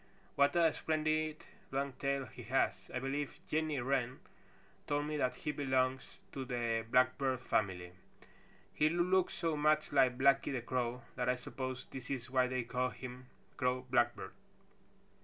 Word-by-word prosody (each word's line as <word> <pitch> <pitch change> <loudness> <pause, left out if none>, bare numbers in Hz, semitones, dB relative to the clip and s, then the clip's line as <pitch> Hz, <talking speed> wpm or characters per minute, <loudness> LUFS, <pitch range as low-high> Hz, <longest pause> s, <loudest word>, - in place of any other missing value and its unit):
"What 140 +2 +3
a 165 -3 +4
splendid 155 0 0 0.3
long 135 0 -1
tail 140 +1 -1
he 110 - -11
has. - - +2 0.2
I - - -2
believe 135 +2 -2
Jenny 155 -2 0
Wren 125 0 0 0.7
told 145 0 0
me 150 0 -2
that 125 -3 +1
he 150 - -3
belongs 130 -2 0
to 135 - -4
the 120 -3 -1
Blackbird 130 +1 +3
family. 90 -7 -1 0.8
He 155 - +3
looks 180 +2 +2
so 165 -2 0
much 155 +1 +2
like 130 -3 +4
Blacky 135 +1 +4
the 130 -3 -2
Crow 125 -1 -2
that 125 0 0
I 125 - +3
suppose 130 0 -5
this 130 -2 -9
is 125 -3 -4
why 130 -1 +3
they 130 -1 -1
call 125 +2 -1
him 125 0 -9 0.3
Crow 125 -1 +1
Blackbird." 120 -2 +1
130 Hz, 155 wpm, -35 LUFS, 125-145 Hz, 0.8 s, a